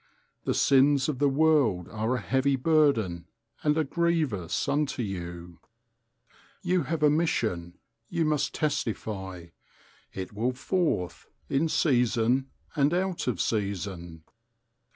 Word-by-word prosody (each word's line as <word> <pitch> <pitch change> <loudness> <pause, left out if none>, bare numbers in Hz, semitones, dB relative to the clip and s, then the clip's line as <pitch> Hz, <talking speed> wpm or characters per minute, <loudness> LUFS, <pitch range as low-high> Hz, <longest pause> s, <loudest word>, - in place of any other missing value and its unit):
The - - 0
sins 140 0 +4
of 135 -4 -3
the 145 -1 +3
world 135 - +2
are 110 +3 -1
a - - -3
heavy 135 +1 +1
burden 130 - +2 0.3
and 150 0 +2
a 160 - +3
grievous 155 - -1
unto 145 -3 0
you. 85 -3 -6 1.0
You 180 0 +2
have 165 -2 -2
a 150 - +6
mission, 115 - -1 0.3
you 170 -2 0
must 150 -2 0
testify; 100 - -3 0.6
it 95 +1 -6
will 120 +5 -1
forth, 140 - -2 0.2
in 155 +4 +1
season 125 -2 +2 0.3
and 145 +3 +2
out 185 -4 -1
of 120 -8 -1
season. 90 -4 -3
130 Hz, 120 wpm, -27 LUFS, 95-150 Hz, 1.0 s, a